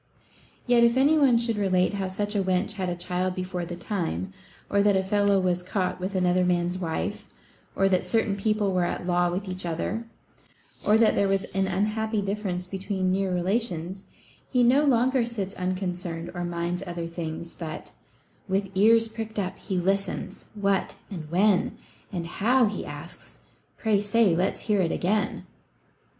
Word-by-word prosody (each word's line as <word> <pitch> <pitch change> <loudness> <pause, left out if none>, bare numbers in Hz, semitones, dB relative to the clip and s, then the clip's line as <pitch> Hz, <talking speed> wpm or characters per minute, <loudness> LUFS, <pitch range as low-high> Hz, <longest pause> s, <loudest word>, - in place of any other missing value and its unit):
Yet, 245 -1 +5
if 235 +1 +4
any 285 +4 +5
one 275 -6 +5
should 230 -2 0
relate 185 -1 +2
how 195 -2 -2
such 205 +3 -3
a 205 - +1
wench 185 +2 +1
had 190 -4 -2
a 175 - -2
child 180 +1 -2
before 185 -1 -3
the 175 +1 -6
time, 165 - -3 0.3
or 200 - +2
that 205 -1 +4
a 190 - +2
fellow 200 0 +3
was 180 -1 +1
caught 185 0 -2
with 190 +2 -4
another 180 0 +3
man's 180 0 +1
wife, 165 -3 -3 0.5
or 195 - +3
that 185 -2 +1
certain 225 -3 +1
people 205 -1 0
were 180 -1 +2
at 175 - -2
law 175 0 +2
with 185 +3 -3
each 185 0 -3
other, 185 +7 -3 0.8
or 215 - +5
that 225 -1 +5
there 200 - +2
was 195 0 +1
an 195 0 +1
unhappy 215 +3 0
difference 195 -3 -2
between 190 0 -2
near 190 0 0
relations, 185 -1 -1 0.5
he 250 -2 +4
no 265 +5 +5
longer 255 -1 +3
sits 210 -5 -4
unconcerned 180 -2 -3
or 175 -1 -3
minds 175 +1 -2
other 170 -1 -4
things, 170 0 -5
but 160 -2 -7 0.6
With 195 0 -1
ears 225 +4 +5
pricked 220 -1 -6
up, 190 -2 -2
he 190 -3 -3
listens. 195 +1 -1
What, 200 -2 0 0.2
and 160 -6 -6
when, 190 +3 +2 0.3
And 175 -4 -3
how, 240 +8 +3
he 210 - -3
asks; - - -10 0.4
pray 215 -3 +2
say, 205 -3 +3
let's 180 +3 0
hear't 195 -6 +1
again 200 +3 0
190 Hz, 170 wpm, -26 LUFS, 180-210 Hz, 0.8 s, Yet